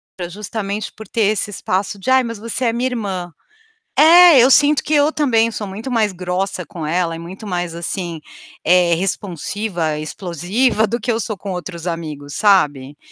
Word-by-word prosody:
pra 175 Hz, -2 st, -6 dB
justamente 205 Hz, +2 st, -5 dB
por 220 Hz, -, -11 dB
ter 230 Hz, -, -2 dB
esse 210 Hz, 0 st, +1 dB
espaço 195 Hz, 0 st, -2 dB
de: 190 Hz, -, -4 dB
"Ai, 260 Hz, 0 st, +5 dB
mas 230 Hz, -1 st, -5 dB
você 230 Hz, +4 st, -3 dB
é 230 Hz, -, +1 dB
minha 245 Hz, +2 st, 0 dB
irmã". 195 Hz, -7 st, -4 dB, 0.7 s
É, 335 Hz, -1 st, +8 dB
eu 250 Hz, -, +6 dB
sinto 290 Hz, +2 st, +5 dB
que 310 Hz, -, -3 dB
eu 295 Hz, +1 st, +4 dB
também 230 Hz, -7 st, +2 dB
sou 210 Hz, -2 st, -5 dB
muito 215 Hz, +7 st, -6 dB
mais 220 Hz, -4 st, +1 dB
grossa 180 Hz, +2 st, -3 dB
com 170 Hz, -7 st, -7 dB
ela 170 Hz, 0 st, 0 dB
e 165 Hz, -, -8 dB
muito 185 Hz, +6 st, -9 dB
mais, 175 Hz, -3 st, -3 dB
assim, 170 Hz, -1 st, -4 dB, 0.4 s
eh, 175 Hz, 0 st, +4 dB
responsiva, 175 Hz, -2 st, -3 dB
explosiva 190 Hz, -, 0 dB
do 235 Hz, +4 st, -2 dB
que 245 Hz, -, -1 dB
eu 225 Hz, -, -1 dB
sou 215 Hz, -3 st, -4 dB
com 195 Hz, 0 st, -6 dB
outros 175 Hz, -1 st, -6 dB
amigos, 155 Hz, -4 st, -5 dB
sabe, 145 Hz, -9 st, +2 dB
195 Hz, 185 wpm, -18 LUFS, 175-230 Hz, 0.7 s, É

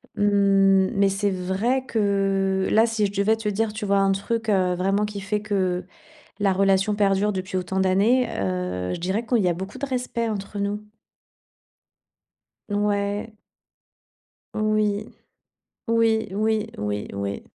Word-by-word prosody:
Mmh, 195 Hz, -2 st, +4 dB
mais 200 Hz, 0 st, +3 dB
c'est 200 Hz, +1 st, 0 dB
vrai 195 Hz, +8 st, -1 dB
que 195 Hz, -4 st, +1 dB
là, 220 Hz, +1 st, +5 dB
si 225 Hz, -2 st, 0 dB
je -, -, -8 dB
devais 200 Hz, +2 st, +2 dB
te 220 Hz, -1 st, -3 dB
dire, 210 Hz, +1 st, -1 dB
tu 215 Hz, -1 st, -4 dB
vois? 200 Hz, 0 st, +2 dB
Un 195 Hz, 0 st, +3 dB
truc, 220 Hz, +3 st, -2 dB
heu, 185 Hz, -3 st, +2 dB
vraiment 195 Hz, +3 st, +1 dB
qui 210 Hz, -1 st, -6 dB
fait 205 Hz, +2 st, -2 dB
que 185 Hz, -4 st, -1 dB, 0.6 s
la 200 Hz, -1 st, +3 dB
relation 195 Hz, +2 st, +2 dB
perdure 205 Hz, 0 st, +2 dB
depuis 185 Hz, -1 st, -4 dB
autant 185 Hz, +1 st, -1 dB
d'années, 205 Hz, +7 st, +3 dB
heu, 90 Hz, -, -2 dB
je -, -, -6 dB
dirais 190 Hz, +6 st, -1 dB
qu'il 240 Hz, 0 st, +2 dB
y 180 Hz, -, +2 dB
a 175 Hz, -, +1 dB
beaucoup 190 Hz, +4 st, -7 dB
de 280 Hz, -, -3 dB
respect, 250 Hz, -3 st, -2 dB
entre 205 Hz, -1 st, -5 dB
nous. 200 Hz, +1 st, -2 dB, 1.9 s
N 205 Hz, -, -3 dB
ouais. 205 Hz, +1 st, -1 dB, 1.2 s
Oui. 215 Hz, -1 st, 0 dB, 0.7 s
Oui, 225 Hz, -1 st, +2 dB
oui, 215 Hz, +2 st, 0 dB
oui, 105 Hz, 0 st, -3 dB
oui. 100 Hz, 0 st, -4 dB
200 Hz, 150 wpm, -24 LUFS, 190-215 Hz, 1.9 s, là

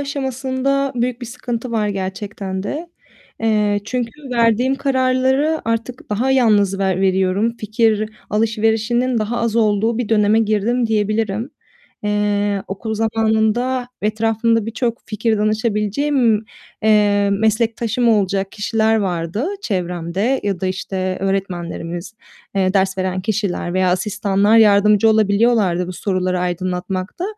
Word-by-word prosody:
aşamasında 275 Hz, 0 st, -1 dB
büyük 245 Hz, 0 st, -1 dB
bir 245 Hz, -, -6 dB
sıkıntı 240 Hz, +1 st, -5 dB
var 215 Hz, -2 st, 0 dB
gerçekten 190 Hz, 0 st, -4 dB
de, 305 Hz, -, -5 dB, 0.5 s
eee, 210 Hz, -2 st, +1 dB
çünkü 240 Hz, +1 st, -2 dB, 0.2 s
verdiğim 235 Hz, +2 st, +2 dB
kararları 265 Hz, +3 st, +1 dB
artık 230 Hz, +2 st, -3 dB
daha 235 Hz, +6 st, 0 dB
yalnız 210 Hz, -7 st, +3 dB
ver 190 Hz, -1 st, 0 dB
veriyorum, 190 Hz, +4 st, +1 dB
fikir 215 Hz, 0 st, +1 dB, 0.2 s
alışverişinin 225 Hz, +3 st, +1 dB
daha 220 Hz, +2 st, -2 dB
az 230 Hz, -1 st, 0 dB
olduğu 220 Hz, +1 st, +2 dB
bir 245 Hz, -4 st, -2 dB
döneme 215 Hz, 0 st, +3 dB
girdim 225 Hz, +3 st, +1 dB
diyebilirim. 215 Hz, +2 st, -1 dB, 0.5 s
Eee, 205 Hz, -1 st, 0 dB
okul 220 Hz, +3 st, -4 dB
zamanında 225 Hz, +3 st, 0 dB
ve -, -, +1 dB
etrafımda 225 Hz, +1 st, +1 dB
birçok 230 Hz, +1 st, -2 dB
fikir 215 Hz, 0 st, 0 dB
danışabileceğim, 220 Hz, +3 st, +1 dB, 0.4 s
emm, 205 Hz, -2 st, +3 dB
meslektaşım 230 Hz, +2 st, +1 dB
olacak 195 Hz, -3 st, +1 dB
kişiler 220 Hz, +1 st, +1 dB
vardı 185 Hz, -, -2 dB, 0.2 s
çevremde 180 Hz, -, -1 dB
ya 195 Hz, -3 st, -1 dB
da, 190 Hz, -, -1 dB
işte, 185 Hz, 0 st, -3 dB
öğretmenlerimiz, 180 Hz, -2 st, -3 dB, 0.4 s
eee, 190 Hz, -1 st, +1 dB
ders 190 Hz, 0 st, +1 dB
veren 185 Hz, 0 st, -1 dB
kişiler 195 Hz, -3 st, -2 dB
veya 185 Hz, -1 st, +2 dB
asistanlar 200 Hz, +2 st, +1 dB
yardımcı 210 Hz, 0 st, +5 dB
olabiliyorlardı 210 Hz, -4 st, +2 dB
bu 180 Hz, -, -5 dB
soruları 185 Hz, -1 st, -1 dB
aydınlatmakta 185 Hz, -, -3 dB
215 Hz, 120 wpm, -19 LUFS, 195-230 Hz, 0.5 s, yardımcı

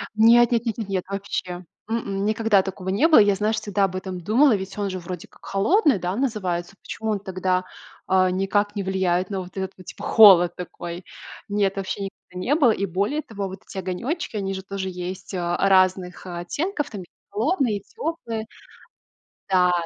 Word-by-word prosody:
Нет 235 Hz, +2 st, +6 dB
нет 235 Hz, 0 st, +1 dB
нет 225 Hz, -1 st, -2 dB
нет 215 Hz, -3 st, -5 dB
нет, 185 Hz, -2 st, -1 dB
вообще. 185 Hz, -2 st, -4 dB, 0.2 s
М-м, 200 Hz, -3 st, -2 dB
никогда 215 Hz, -2 st, +3 dB
такого 190 Hz, -1 st, -5 dB
не 240 Hz, +12 st, +3 dB
было. 315 Hz, -, +7 dB
Я 205 Hz, -1 st, +5 dB
знаешь 215 Hz, +2 st, 0 dB
всегда 200 Hz, -1 st, +1 dB
об 185 Hz, -1 st, -4 dB
этом 185 Hz, -1 st, -5 dB
думала, 235 Hz, -, +4 dB
ведь 190 Hz, +1 st, -6 dB
он 200 Hz, -1 st, -1 dB
же 185 Hz, 0 st, -4 dB
вроде 180 Hz, 0 st, -7 dB
как -, -, -20 dB
холодный, 275 Hz, -, +3 dB
да, 180 Hz, +2 st, -2 dB
называется. 195 Hz, -8 st, -2 dB
Почему 220 Hz, -1 st, -4 dB
он 205 Hz, -, 0 dB
тогда, 185 Hz, -1 st, -1 dB, 0.4 s
а, 185 Hz, -1 st, +4 dB
никак 205 Hz, +3 st, 0 dB
не 200 Hz, -, -2 dB
влияет 185 Hz, -1 st, 0 dB
на 195 Hz, -2 st, -2 dB
вот 180 Hz, 0 st, -9 dB
этот 190 Hz, 0 st, -2 dB
вот, 185 Hz, -, -14 dB
типа -, -, -10 dB
холод 185 Hz, -6 st, +7 dB
такой? 175 Hz, 0 st, -7 dB, 0.4 s
Нет, 200 Hz, -1 st, +1 dB
вообще 195 Hz, +1 st, -3 dB
никогда 190 Hz, -2 st, -9 dB
не 290 Hz, -, +3 dB
было. 265 Hz, -8 st, +5 dB
И 200 Hz, -, -1 dB
более 200 Hz, -, -1 dB
того, 205 Hz, -8 st, -5 dB
вот 190 Hz, 0 st, -9 dB
эти -, -, -10 dB
огонечки 235 Hz, -, -3 dB
они 195 Hz, -1 st, -2 dB
же 190 Hz, 0 st, -5 dB
тоже 195 Hz, -1 st, -4 dB
есть, 180 Hz, +2 st, -6 dB
а, 175 Hz, -1 st, -1 dB
разных, 185 Hz, -2 st, +2 dB
э, 175 Hz, -1 st, -5 dB
оттенков. 295 Hz, -, -2 dB
Там 195 Hz, -4 st, -7 dB, 0.3 s
холодные, 235 Hz, -, +1 dB
и -, -, -9 dB
теплые 235 Hz, -, -4 dB, 1.0 s
да, 180 Hz, -1 st, +4 dB
195 Hz, 190 wpm, -23 LUFS, 185-220 Hz, 1.0 s, было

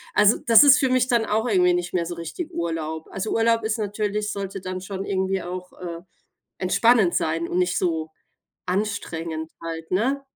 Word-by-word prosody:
also, 210 Hz, +1 st, +5 dB
das 230 Hz, +3 st, +9 dB
ist 280 Hz, -2 st, +7 dB
für 265 Hz, -, +2 dB
mich 255 Hz, 0 st, +2 dB
dann 235 Hz, -3 st, +2 dB
auch 220 Hz, +3 st, 0 dB
irgendwie 180 Hz, -5 st, +3 dB
nicht 175 Hz, 0 st, -3 dB
mehr 170 Hz, -2 st, 0 dB
so 175 Hz, -, -5 dB
richtig 170 Hz, -, -6 dB
Urlaub. 160 Hz, -, -4 dB
Also, 195 Hz, +3 st, -4 dB
Urlaub 230 Hz, 0 st, +2 dB
ist 220 Hz, +1 st, -1 dB
natürlich 210 Hz, 0 st, -2 dB
sollte 195 Hz, -1 st, -5 dB
dann 185 Hz, 0 st, -5 dB
schon 195 Hz, 0 st, -5 dB
irgendwie 190 Hz, -1 st, -1 dB
auch, 180 Hz, +1 st, -7 dB
äh, 170 Hz, -2 st, -6 dB, 0.6 s
entspannend 205 Hz, 0 st, +3 dB
sein 165 Hz, +1 st, 0 dB
und 180 Hz, -, -1 dB
nicht 180 Hz, -1 st, +1 dB
so 160 Hz, -3 st, -1 dB, 0.6 s
anstrengend 170 Hz, -5 st, -3 dB
halt, 165 Hz, -1 st, -6 dB
ne? 260 Hz, +9 st, 0 dB
190 Hz, 180 wpm, -23 LUFS, 170-220 Hz, 0.6 s, das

